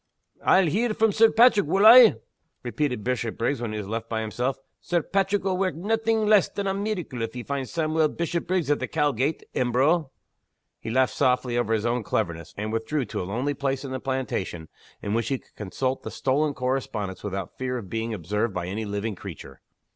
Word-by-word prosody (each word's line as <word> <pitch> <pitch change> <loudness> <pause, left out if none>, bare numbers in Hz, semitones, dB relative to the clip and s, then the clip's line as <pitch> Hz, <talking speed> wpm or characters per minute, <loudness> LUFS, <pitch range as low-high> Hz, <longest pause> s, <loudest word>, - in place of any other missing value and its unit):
"I'll 190 - +5
hear 215 +7 0
from 220 -1 +3
Sir 220 +2 +5
Paitrick, 225 -5 +5
wull 195 +6 +3
I?" 235 0 +10 0.5
repeated 125 -2 -2
Bishopriggs 120 +1 -1
when 120 -3 -3
he 110 - -4
was 105 -2 -5
left 115 +1 -4
by 110 -1 -1
himself. 125 +4 -2 0.2
"Sir 175 -3 -1
Paitrick 195 +2 0
will 190 -1 -1
wark 185 -5 0
naething 225 +4 0
less 210 -3 +5
than 200 - -4
a 195 - 0
meeracle 195 - -3
if 115 +1 -4
he 125 - -5
finds 140 -1 -3
Sawmuel 160 -1 +1
Bishopriggs 170 -1 -1
at 145 - +2
the - - -3
Cowgate, 145 -1 0
Embro!" 135 +6 +2 0.7
He - - -6
laughed 130 +2 +2
softly 125 -1 +1
over 120 -2 0
his 110 0 +1
own 120 +1 0
cleverness; 85 -5 -2
and 105 +2 -3
withdrew 125 +5 -1
to - - -4
a 90 - -5
lonely 130 +8 -1
place 135 0 -2
in 135 - -6
the 130 - -3
plantation, 125 -11 -3 0.3
in 100 - -2
which 115 0 0
he 135 - 0
could - - -24
consult 130 +6 -3
the - - -6
stolen 140 +2 0
correspondence 125 -7 -3
without 95 -3 -5
fear 125 -1 -2
of 110 -5 -7
being 115 +3 -3
observed 105 +2 -2
by 90 -1 -2
any 105 +5 -4
living 105 +2 -3
creature. 70 -7 -10
130 Hz, 200 wpm, -25 LUFS, 110-170 Hz, 0.7 s, I